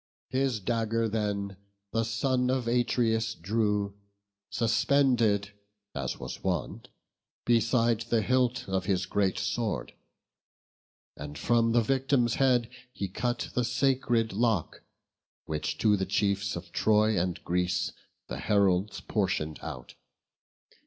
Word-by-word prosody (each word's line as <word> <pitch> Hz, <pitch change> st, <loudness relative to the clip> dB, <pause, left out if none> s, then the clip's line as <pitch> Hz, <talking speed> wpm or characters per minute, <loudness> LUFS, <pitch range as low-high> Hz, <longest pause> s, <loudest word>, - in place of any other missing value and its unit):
His 130 Hz, -3 st, 0 dB
dagger 115 Hz, +1 st, 0 dB
then 100 Hz, -3 st, -2 dB, 0.3 s
the 115 Hz, 0 st, +1 dB
son 125 Hz, +3 st, 0 dB
of 130 Hz, -2 st, 0 dB
Atreus 115 Hz, -2 st, +1 dB
drew, 105 Hz, +1 st, 0 dB, 0.6 s
Suspended, 115 Hz, -3 st, +2 dB, 0.4 s
as 65 Hz, -2 st, -3 dB
was -, -, -7 dB
wont, 90 Hz, -8 st, -3 dB, 0.6 s
beside 115 Hz, -1 st, +3 dB
the 115 Hz, -2 st, +2 dB
hilt 125 Hz, 0 st, +1 dB
Of 95 Hz, -1 st, -1 dB
his 95 Hz, -2 st, +1 dB
great 95 Hz, -1 st, 0 dB
sword; 100 Hz, +4 st, -2 dB, 1.2 s
and 75 Hz, 0 st, -8 dB
from 115 Hz, +5 st, +2 dB
the 120 Hz, -1 st, +4 dB
victim's 130 Hz, -1 st, +2 dB
head 125 Hz, -3 st, +3 dB, 0.2 s
He 100 Hz, -, -4 dB
cut 120 Hz, +4 st, -2 dB
the 125 Hz, -, +1 dB
sacred 120 Hz, -4 st, +1 dB
lock, 110 Hz, -4 st, 0 dB, 0.6 s
which 75 Hz, -1 st, -3 dB
to 105 Hz, -2 st, +3 dB
the 95 Hz, -1 st, -2 dB
chiefs 100 Hz, 0 st, 0 dB
Of 85 Hz, +2 st, -8 dB
Troy 110 Hz, -2 st, +3 dB
and 90 Hz, -1 st, -2 dB
Greece 90 Hz, +1 st, 0 dB, 0.4 s
the 65 Hz, -, -5 dB
heralds 100 Hz, +1 st, +1 dB
portion'd 75 Hz, -1 st, -1 dB
out. 65 Hz, -2 st, -8 dB
110 Hz, 120 wpm, -29 LUFS, 100-120 Hz, 1.2 s, the